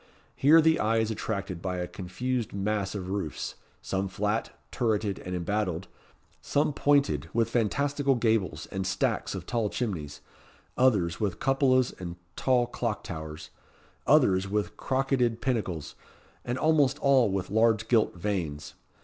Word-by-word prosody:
Here 155 +4 +6
the 160 0 +3
eye 110 +1 +2
is 110 0 +1
attracted 100 -5 -4
by 90 0 -2
a 90 - -2
confused 120 +7 -3
mass 100 0 -1
of 95 -2 -4
roofs, 95 -6 -3 0.3
some 95 0 -1
flat, 105 +4 -1 0.2
turreted 110 -5 0
and 90 0 -5
embattled, 90 0 -2 0.5
some 145 +1 +1
pointed, 140 - +2
with 115 -1 +1
fantastical 140 +4 +1
gables 110 -9 0
and 95 -1 -2
stacks 95 - -1
of - - -6
tall 115 -4 -1
chimneys 85 -13 -4 0.5
others 100 -10 +2
with 100 -5 -1
cupolas 130 -2 +3
and 85 -2 -6 0.2
tall 125 -2 +2
clock 120 -2 -3
towers 80 -1 -7 0.6
others 95 +1 +4
with 105 +1 -1
crocketed 130 -3 0
pinnacles, 105 - -2 0.5
and 120 +1 -2
almost 155 -3 +3
all 135 -5 +4
with 95 -1 -3
large 110 0 +3
gilt 115 -5 +2
vanes. 85 -6 -3
105 Hz, 140 wpm, -28 LUFS, 95-125 Hz, 0.6 s, Here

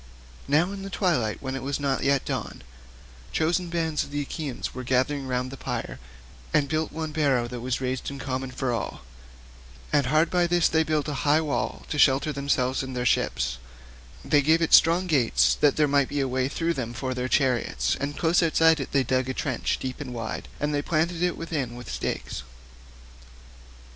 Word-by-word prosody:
Now 160 +7 +3
in 200 -1 -6
the 195 - -6
twilight 165 - 0
when 130 0 -3
it 135 - -4
was 140 +3 -2
not 140 -2 0
yet 140 -1 +2
dawn, - - -4 0.7
chosen 170 +2 0
bands 160 -2 0
of - - -10
the 145 0 -2
Achaeans 145 -2 -5
were 130 - -6
gathered 130 +3 +1
round 125 0 -2
the 135 - -8
pyre - - -4 0.5
and 140 - +2
built 155 +1 -1
one 160 -1 -4
barrow 140 -6 +1
that 125 0 -6
was 125 0 -1
raised 130 -1 -2
in 140 - -7
common 130 -1 -3
for 125 0 -2
all, 115 - -4 0.9
and 140 -3 +3
hard 155 +4 +3
by 175 -1 +3
this 175 0 +3
they 160 - +2
built 155 -1 0
a 150 - -2
high 150 +1 +4
wall 155 -3 -2
to 150 - -2
shelter 140 +2 +4
themselves 135 -2 0
and 130 -1 -6
their 125 - -1
ships; 60 - 0 0.7
they 145 -2 +4
gave 160 +4 +4
it 165 - 0
strong 170 +3 +6
gates 140 -10 +3
that 145 - +5
there 150 -1 +3
might 140 -1 +2
be 145 - -2
a 135 - +1
way 130 0 0
through 165 +3 -1
them 120 -5 -4
for 130 +2 -3
their 125 0 -2
chariots, 130 -5 +1
and 145 +1 -3
close 170 +1 +3
outside 160 -1 +4
it 135 - -5
they 135 -1 +3
dug 130 +1 0
a 130 - -3
trench 130 -6 -1
deep 130 +2 -5
and 125 -4 -6
wide, 115 -1 -5
and 150 0 -1
they 145 - +1
planted 165 +2 0
it 180 -1 +1
within 145 -8 -3
with 120 -2 -8
stakes. - - -3
140 Hz, 200 wpm, -26 LUFS, 130-160 Hz, 0.9 s, strong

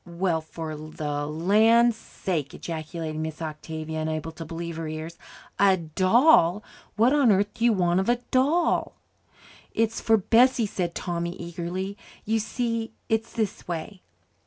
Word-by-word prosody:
"Well, 170 -1 -1
for 160 0 -6
the 150 -1 -4
land's 215 +9 +4
sake!" 170 -9 -4
ejaculated 160 -1 -5
Miss 160 0 -4
Octavia, 160 0 -5
unable 155 0 -3
to 165 +1 -8
believe 165 +1 -6
her 165 -1 -4
ears. 155 +2 -6 0.4
"A 195 -2 +5
doll! 185 - +4 0.3
What 235 +5 +4
on 280 -6 +5
earth 205 +1 +2
do 230 - -5
you 235 -1 +5
want 175 -2 +2
of 190 - 0
a 240 - +5 0.2
doll?" 295 +7 +2 0.8
"It's 225 0 0
for 225 0 +4
Bessie," 235 +4 +4
said 180 -4 -3
Tommy 170 -1 -3
eagerly. 180 +3 -5 0.3
"You 225 +1 +1
see, 230 0 -2 0.2
it's 225 0 0
this 215 -4 -3
way." 175 +3 -5
175 Hz, 145 wpm, -26 LUFS, 160-225 Hz, 0.8 s, A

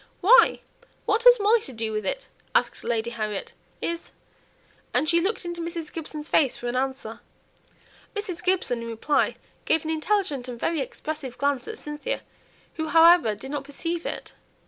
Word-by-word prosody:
"Why, 445 +7 +6 0.4
what 460 +3 +1
has - - +9
Molly 425 +3 +4
to 265 - -6
do 225 -1 -2
with 215 0 -2
it?" - - -2 0.3
asked - - +2
Lady 235 0 -1
Harriet. 215 -4 -4 0.3
"Is 335 0 -4 0.4
?" - - -34
and 310 - +3
she 340 +1 +4
looked 385 +1 -1
into 345 0 -4
Mrs. 335 -1 -5
Gibson's 305 -2 -5
face 275 -6 +3
for - - -8
an 240 - -2
answer. 260 -4 -2 1.0
Mrs. 395 -5 -4
Gibson 360 -10 +2
in 230 - -6
reply 230 +6 +1 0.3
gave 320 - +2
an 320 - -2
intelligent 315 -5 0
and 240 -2 -7
very 325 +2 0
expressive 275 -1 -5
glance 280 -2 0
at 445 0 -6
Cynthia, 300 +12 -4 0.6
who 315 -1 -2
however 330 -9 +6
did 265 +6 -9
not 290 -2 -3
perceive 330 +4 -4
it. - - -6
310 Hz, 170 wpm, -25 LUFS, 250-345 Hz, 1.0 s, has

